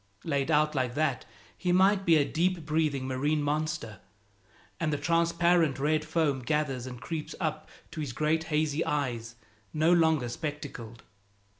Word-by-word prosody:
Laid 140 -3 -1
out 150 0 +3
like 130 -3 -1
that, 150 -4 0 0.3
he 180 - -1
might 190 +1 +3
be 165 - +6
a 145 - +3
deep 175 +1 0
breathing 150 -4 0
marine 145 +3 0
monster, 150 -8 -2 0.8
and 165 -2 0
the 145 - 0
transparent 170 0 +2
red 155 +3 +1
foam 155 -4 +1
gathers 135 -2 -1
and 125 -2 -8
creeps 155 +4 -5
up 155 -2 -3 0.2
to 155 - -5
his 145 -4 -3
great 155 +5 0
hazy 155 0 0
eyes, 120 -5 -2 0.4
no 160 +3 +3
longer 160 -6 +3
spectacled. 125 -4 -6
150 Hz, 150 wpm, -29 LUFS, 135-160 Hz, 0.8 s, be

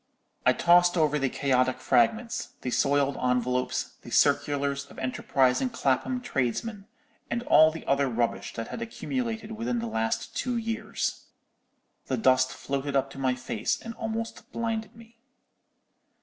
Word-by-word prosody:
"I - - +7
tossed 175 +1 +5
over 150 -2 +2
the 135 -1 +1
chaotic 130 -1 +1
fragments, 220 - +1
the 125 - -3
soiled 140 +1 +2
envelopes, 125 0 -1
the - - -11
circulars 140 -1 +2
of - - -14
enterprising 130 - +1
Clapham 235 - 0
tradesmen, 200 - -2 0.4
and 235 - -2
all 155 -8 +6
the 160 +1 -8
other 140 -1 +2
rubbish 120 0 -2
that 115 0 -5
had - - -6
accumulated 230 -2 -3
within 230 +3 -2
the 235 - -2
last 115 - -2
two 250 -2 -1
years. 225 0 -3 0.8
The - - 0
dust 130 -10 +3
floated 140 +1 -3
up 135 0 +1
to 135 - -9
my 130 -1 +1
face 115 -4 -2
and 230 - -7
almost 225 +1 -5
blinded 225 -1 -3
me. 230 0 -17
145 Hz, 145 wpm, -27 LUFS, -, 0.8 s, I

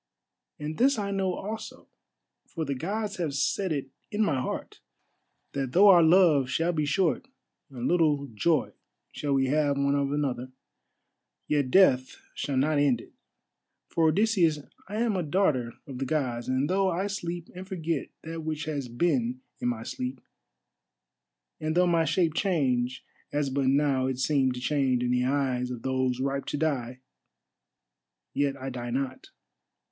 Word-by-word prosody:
And 150 +1 -5
this 270 +2 +4
I 200 -1 -2
know 190 -2 0
also, 220 +3 -7 0.6
for 165 -3 -4
the 140 - -1
Gods 205 +9 -3
have 160 -6 -2
set 185 +6 0
it 135 -3 -3 0.2
in 215 0 +1
my 140 -10 +1
heart, - - -5 0.7
that 135 -2 -3
though 200 +3 +7
our 175 -3 +8
love 160 -5 +5
shall 165 +5 +1
be 155 -2 0
short, 180 - +1 0.4
and 125 -3 -4
little 155 -5 +2
joy 140 +6 0 0.4
shall 145 -1 -2
we 135 0 +3
have 145 +1 +1
one 140 0 +2
of 140 -1 0
another, 130 -4 -2 1.0
yet 145 -3 +1
death 130 -6 +4 0.2
shall 140 -2 -2
not 145 +2 +2
end 135 -5 +3
it. - - -14 0.8
For, 165 -1 +2
Odysseus, 180 -2 +3 0.3
I 205 - -5
am 225 -1 +1
a 185 - 0
daughter 145 - +1
of 130 -3 -8
the 135 - -1
Gods, 125 -6 -1
and 130 +2 +1
though 190 +2 +2
I 185 +2 -1
sleep 175 -4 -4
and 185 +1 -8
forget 170 -4 -2 0.2
that 165 +1 -5
which 155 -1 -3
has 145 -4 -3
been 230 - 0 0.2
in - - -1
my 115 -2 -2
sleep, 125 +2 -4 1.4
and 155 +2 -1
though 180 - +5
my 170 -2 +3
shape 165 +1 +1
change 130 -10 0 0.3
as 145 -2 0
but 135 0 0
now 135 -1 +2
it 130 -1 -2
seemed 130 -1 +2
to - - -5
change 130 -3 +1
in 125 - 0
the 125 0 +2
eyes 130 -2 0
of 125 -2 -6
those 130 -1 0
ripe 140 +1 -1
to - - -3
die, 130 -5 -2 1.3
yet 140 -1 0
I 135 +1 -5
die 120 -1 -5
not. 130 +1 -3
145 Hz, 165 wpm, -28 LUFS, 130-175 Hz, 1.4 s, our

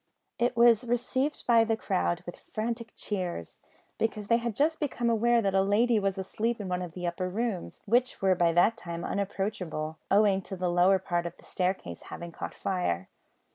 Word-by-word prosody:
It 240 0 +1
was 235 0 +6
received 250 +4 -1
by 230 -2 +6
the 225 0 0
crowd 85 - -1
with 175 - -8
frantic 230 +1 -4
cheers, 180 - -4 0.4
because 215 -2 -1
they 230 - +5
had 235 -2 -3
just 315 +3 +1
become 245 -5 0
aware 235 +1 +3
that 195 -1 +1
a 195 - +4
lady 215 +4 +3
was 195 -1 -1
asleep 220 +5 -2
in 205 - -4
one 180 0 -1
of 175 -3 -6
the 180 0 -5
upper 175 +1 -2
rooms, 215 -1 -3
which 245 +4 +2
were 190 -1 +4
by 175 -2 +3
that 210 +7 +4
time 170 -5 -6
unapproachable, 185 -6 -3
owing 200 -1 +4
to 190 - -7
the 180 -1 -1
lower 180 +2 +5
part 175 -2 -1
of 170 - -9
the - - -19
staircase 180 - -2
having 170 0 -7
caught - - -6
fire. 95 - -1
195 Hz, 190 wpm, -29 LUFS, 180-230 Hz, 0.4 s, was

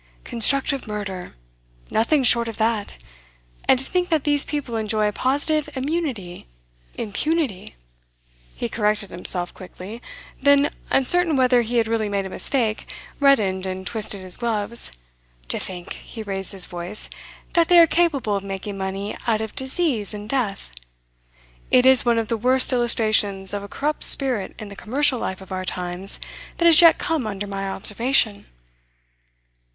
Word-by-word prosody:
'Constructive 270 +3 +2
murder 195 -4 -6 0.6
nothing 265 +6 +2
short 235 -1 +6
of 225 - -6
that. 220 -2 -1 0.7
And 265 - +5
to 265 - -1
think 360 +3 -1
that 315 -4 +1
these 290 -1 +2
people 285 -6 -4
enjoy 215 -1 0
a - - 0
positive 290 +5 0
immunity 260 - -4 0.5
impunity.' 230 - -2 0.8
He - - -3
corrected 210 -3 -1
himself 175 0 0
quickly; 190 +5 -10 0.4
then, 285 +1 +4 0.2
uncertain 330 +4 +3
whether 255 -2 +4
he 240 +1 -2
had 225 -1 +2
really 220 -2 -1
made 200 -1 -1
a 190 - -7
mistake, 225 -3 -1 0.3
reddened 205 -10 +3
and 190 0 -5
twisted 215 -3 -2
his 185 -1 -3
gloves. 230 -1 -2 0.6
'To - - -1
think' 180 -2 -6
he 225 - -9
raised 195 -2 0
his 190 -2 +1
voice 175 +3 -3 0.5
'that 335 -2 +3
they 355 - +5
are 335 - +9
capable 300 -10 +1
of 200 - -3
making 195 +1 -6
money 195 +2 -4
out 220 -2 +2
of 220 -1 -5
disease 265 - -1
and 205 0 -8
death! 215 - -2 1.0
It 250 0 +4
is 260 -1 +6
one 235 -1 +2
of 225 -1 -1
the 230 - -1
worst 255 +3 +4
illustrations 215 -5 +1
of 205 - -3
a 200 - -8
corrupt 300 +2 -2
spirit 250 -8 +3
in 215 - -8
the 200 - -10
commercial 260 +5 0
life 190 -3 -4
of 190 - -13
our 185 0 -3
times 180 +1 -3 0.4
that 340 - 0
has 335 -1 +8
yet 335 -1 +7
come 320 -9 -2
under 205 -1 -4
my 195 -1 -4
observation. 210 - 0
225 Hz, 155 wpm, -22 LUFS, 195-270 Hz, 1.0 s, are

